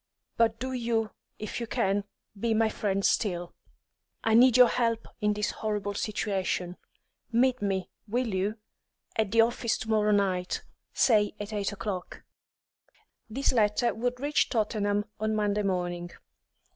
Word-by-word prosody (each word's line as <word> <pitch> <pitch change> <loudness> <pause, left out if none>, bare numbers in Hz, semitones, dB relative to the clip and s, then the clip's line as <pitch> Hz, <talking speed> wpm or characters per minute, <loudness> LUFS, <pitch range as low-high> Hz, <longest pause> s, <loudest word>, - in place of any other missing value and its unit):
But 225 -1 +2
do 260 +2 -3
you, 230 -3 0 0.3
if 215 - -5
you 235 - -4
can, 205 -4 0 0.3
be 225 +2 0
my 220 0 +3
friend 195 -2 -1
still. 175 -6 0 0.7
I 225 - +2
need 245 +1 +7
your 250 -1 +9
help 230 -2 0
in 210 -1 +2
this 210 0 -1
horrible 210 -2 -2
situation. 195 -4 -2 0.5
Meet 250 +1 +3
me 195 -2 -1 0.2
will 235 0 -1
you? 200 +4 -1 0.6
at 220 -3 +1
the 225 +2 +5
office 235 0 +1
to 220 - -7
morrow 210 -1 +3
night, 190 -3 +1 0.3
say 210 -4 +3
at 205 +1 -6
eight 205 -1 -1
o'clock." 195 -3 -5 1.1
This 270 +5 0
letter 220 +1 +2
would 245 +2 -2
reach 290 +3 +1
Tottenham 210 -2 0
on 215 0 0
Monday 210 -1 +1
morning. 175 -3 -2
215 Hz, 145 wpm, -28 LUFS, 200-230 Hz, 1.1 s, your